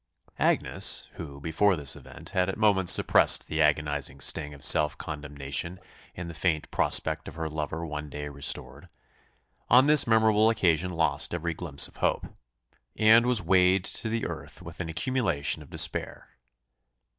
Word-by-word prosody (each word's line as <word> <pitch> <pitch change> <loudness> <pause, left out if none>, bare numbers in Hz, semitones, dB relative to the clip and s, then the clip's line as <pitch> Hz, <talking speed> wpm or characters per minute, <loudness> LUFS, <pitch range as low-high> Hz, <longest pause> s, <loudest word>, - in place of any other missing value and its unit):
Agnes, - - +1
who, 70 -3 -10
before 80 +7 +1
this 70 -4 -1
event, - - -11
had 90 0 0
at - - -4
moments 100 -4 +3
suppressed - - +4
the 80 0 -2
agonising 75 -2 0
sting 75 +2 0
of 70 -1 -10
self 75 -1 +3
condemnation 75 +3 -4 0.4
in 90 -1 -7
the 85 - -8
faint 80 -1 -2
prospect 80 0 +2
of - - -9
her 80 -1 -4
lover 80 +1 -5
one 75 -1 -6
day 75 +1 -7
restored, 70 -1 -4 0.8
on 125 +3 +6
this 150 -3 +4
memorable 110 -1 +3
occasion 90 -5 +1
lost 80 -1 -1
every 85 0 -3
glimpse - - -1
of - - -20
hope, - - -1 0.7
and 110 +2 +5
was 120 -5 +2
weighed 90 +1 +2
to 110 - -4
the 115 0 -2
earth - - -8
with 85 -1 -11
an 85 -3 -5
accumulation 95 - -1
of - - -14
despair. - - -2
80 Hz, 155 wpm, -26 LUFS, 75-100 Hz, 0.8 s, on